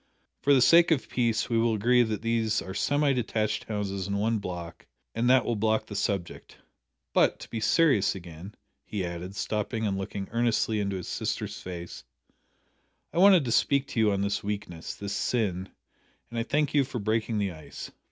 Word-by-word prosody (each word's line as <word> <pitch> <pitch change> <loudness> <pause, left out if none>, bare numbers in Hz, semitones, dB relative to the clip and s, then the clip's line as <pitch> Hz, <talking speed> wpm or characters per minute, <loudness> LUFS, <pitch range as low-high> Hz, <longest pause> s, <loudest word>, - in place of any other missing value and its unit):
For 145 - +2
the 130 -3 +6
sake 170 +5 +6
of 155 -5 +1
peace 115 -3 0
we 115 -2 +1
will 115 -1 +2
agree 120 +4 +4
that 110 -2 -1
these 115 -2 +1
are 95 - -6
semi 145 +6 +2
detached 110 -2 -1
houses 100 -3 -3
in 100 0 -1
one 110 +2 +1
block 90 -3 -7 0.3
and 120 +2 +1
that 130 -1 +5
will 120 - 0
block 110 +1 +1
the 105 - -8
subject. 100 -3 -3 0.6
But, - - +3
to - - -10
be 115 - -3
serious 110 - +3
again," 90 +2 -10 0.3
he 100 +2 -3
added, 90 +3 -6
stopping 110 +3 -2
and 100 -2 -1
looking 95 0 -5
earnestly 115 -2 +1
into 100 -1 -1
his 90 - -5
sister's - - -3
face, 90 -1 -7 1.1
"I - - 0
wanted 185 -5 +7
to 120 - -2
speak 140 +3 +2
to 120 - -2
you 110 -2 +4
on 100 -1 0
this 100 0 -1
weakness 100 -5 -5
this 100 0 -5
sin 100 -4 -1 0.6
and 115 - -3
I - - +1
thank 145 +4 0
you 145 -2 +4
for 130 -1 -6
breaking 110 +1 -1
the 100 -2 0
ice. 80 -3 -9
110 Hz, 190 wpm, -28 LUFS, 100-120 Hz, 1.1 s, wanted